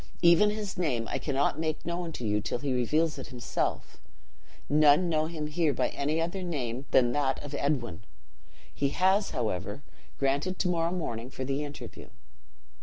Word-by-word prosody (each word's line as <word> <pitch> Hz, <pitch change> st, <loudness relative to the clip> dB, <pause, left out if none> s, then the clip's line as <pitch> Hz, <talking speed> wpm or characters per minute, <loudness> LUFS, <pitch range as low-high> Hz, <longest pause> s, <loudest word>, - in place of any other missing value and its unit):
Even 170 Hz, +5 st, +7 dB
his 210 Hz, -3 st, -4 dB
name 125 Hz, -10 st, 0 dB
I -, -, -2 dB
cannot 140 Hz, +1 st, 0 dB
make 155 Hz, -1 st, -2 dB
known 170 Hz, 0 st, -3 dB
to 125 Hz, -, -5 dB
you 105 Hz, 0 st, +1 dB
till 105 Hz, -, -2 dB
he 135 Hz, +1 st, -2 dB
reveals 150 Hz, +5 st, +1 dB
it -, -, -7 dB
himself: 120 Hz, -2 st, -3 dB, 0.7 s
none 150 Hz, +3 st, +5 dB
know 155 Hz, -1 st, +1 dB
him 160 Hz, -2 st, -4 dB
here 150 Hz, 0 st, +1 dB
by 125 Hz, -1 st, +1 dB
any 150 Hz, +3 st, -1 dB
other 175 Hz, +4 st, -2 dB
name 135 Hz, -7 st, -3 dB
than 120 Hz, -2 st, +4 dB
that 135 Hz, 0 st, +1 dB
of 145 Hz, 0 st, -7 dB
Edwin. 125 Hz, -, -1 dB, 0.7 s
He 140 Hz, -, 0 dB
has, 190 Hz, +6 st, +3 dB
however, 105 Hz, +2 st, -3 dB, 0.3 s
granted 140 Hz, +7 st, 0 dB
to 180 Hz, -, +1 dB
morrow 170 Hz, -1 st, +1 dB
morning 125 Hz, -10 st, -3 dB
for 130 Hz, 0 st, -5 dB
the 140 Hz, +2 st, -1 dB
interview." 145 Hz, 0 st, -8 dB
145 Hz, 170 wpm, -29 LUFS, 130-170 Hz, 0.7 s, Even